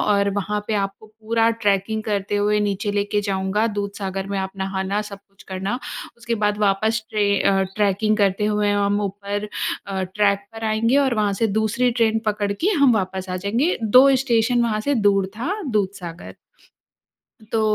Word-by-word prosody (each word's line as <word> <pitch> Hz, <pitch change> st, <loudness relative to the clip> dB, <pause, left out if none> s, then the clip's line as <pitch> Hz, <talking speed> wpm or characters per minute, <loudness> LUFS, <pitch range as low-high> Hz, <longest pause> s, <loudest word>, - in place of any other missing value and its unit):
और 200 Hz, -1 st, +2 dB
वहाँ 205 Hz, +1 st, -1 dB
पे 220 Hz, -, -1 dB
आपको 200 Hz, +1 st, -3 dB
पूरा 225 Hz, +1 st, 0 dB
ट्रैकिंग 215 Hz, -1 st, 0 dB
करते 205 Hz, -1 st, -1 dB
हुए 210 Hz, +1 st, +2 dB
नीचे 205 Hz, 0 st, -1 dB
लेके 205 Hz, 0 st, 0 dB
जाऊँगा 195 Hz, +2 st, 0 dB
दूधसागर 200 Hz, -2 st, -4 dB
में 200 Hz, 0 st, -3 dB
आप 190 Hz, 0 st, -3 dB
नहाना 190 Hz, +1 st, -2 dB
सब 200 Hz, -1 st, -9 dB
कुछ 195 Hz, -, -19 dB
करना, 195 Hz, +6 st, -3 dB, 0.4 s
उसके 235 Hz, 0 st, -3 dB
बाद 210 Hz, 0 st, +1 dB
वापस 215 Hz, +2 st, +1 dB
ट्रे 210 Hz, -1 st, +1 dB
अ, 195 Hz, -1 st, +3 dB
ट्रैकिंग 210 Hz, +1 st, +2 dB
करते 200 Hz, -1 st, +1 dB
हुए 210 Hz, -1 st, +1 dB
हम 205 Hz, 0 st, +1 dB
ऊपर 205 Hz, +1 st, -4 dB, 0.4 s
अ, 195 Hz, -1 st, -2 dB
ट्रैक 200 Hz, +2 st, 0 dB
पर 225 Hz, 0 st, -7 dB
आएँगे 220 Hz, +4 st, +2 dB
और 270 Hz, -3 st, +2 dB
वहाँ 210 Hz, -2 st, +1 dB
से -, -, +5 dB
दूसरी 235 Hz, +3 st, +1 dB
ट्रेन 225 Hz, -2 st, +2 dB
पकड़ 205 Hz, -1 st, 0 dB
के 340 Hz, -, 0 dB
हम 260 Hz, -4 st, +6 dB
वापस 190 Hz, -2 st, -2 dB
आ 185 Hz, -, -2 dB
जाएँगे। 230 Hz, -, 0 dB
2 250 Hz, +5 st, +6 dB, 0.2 s
स्टेशन 240 Hz, 0 st, +2 dB
वहाँ 220 Hz, -2 st, 0 dB
से 285 Hz, +6 st, 0 dB
दूर 200 Hz, -4 st, +3 dB
था 325 Hz, -, -2 dB, 0.2 s
दूधसागर। 190 Hz, -5 st, -3 dB, 1.1 s
अ, -, -, -15 dB
तो 215 Hz, -1 st, +2 dB
205 Hz, 175 wpm, -22 LUFS, 195-220 Hz, 1.1 s, हम